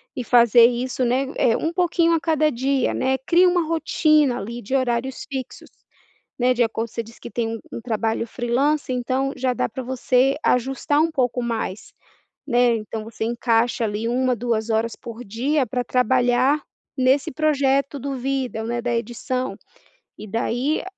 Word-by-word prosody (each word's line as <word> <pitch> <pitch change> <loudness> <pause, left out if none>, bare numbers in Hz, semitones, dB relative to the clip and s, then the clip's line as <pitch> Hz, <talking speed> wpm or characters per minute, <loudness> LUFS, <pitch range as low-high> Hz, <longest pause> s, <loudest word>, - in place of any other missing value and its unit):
E 255 - -3
fazer 235 0 +6
isso, 250 +1 -2
né, 250 +3 +1
eh, 230 - +3
um 325 +1 -2
pouquinho 340 -1 +2
a 330 - +2
cada 310 -2 +1
dia, 265 +2 0
né, 265 0 0
crie 345 +7 +3
uma 355 -2 +2
rotina 305 -4 +2
ali 235 +4 -6
de 260 +7 -3
horários 255 0 -1
fixos, 265 -3 -6 0.7
né, 250 0 +3
de 240 - +2
acordo 225 0 -1
você 230 - -4
disse 230 +1 -16
que - - -8
tem 235 -2 -2
um - - -11 0.2
um - - -5
trabalho 225 -1 -1
freelancer. 255 +4 0
Então, 260 +3 -1
já 255 0 0
dá - - -1
para 255 +4 -6
você 255 +1 +1
ajustar 270 +4 +1
um 325 +1 +2
pouco 250 -3 0
mais, 225 -4 -4 0.5
né, 245 -2 +3
então 215 0 -6
você 220 0 -5
encaixa 235 0 +1
ali 215 +2 -2
1, 255 +1 +1
2 230 -1 -2
horas 225 +1 0
por 235 +1 -9
dia 260 +7 0
pra 250 +2 -2
trabalhar 250 +3 +2 0.3
nesse 265 +5 +2
projeto 280 -2 +1
do 275 +1 -4
vídeo, 255 -3 -2
né, 240 +1 -2
da 240 -1 -1
edição. 245 +3 -3 0.6
E 215 - -9
daí 240 +7 -1
250 Hz, 170 wpm, -22 LUFS, 235-275 Hz, 0.7 s, fazer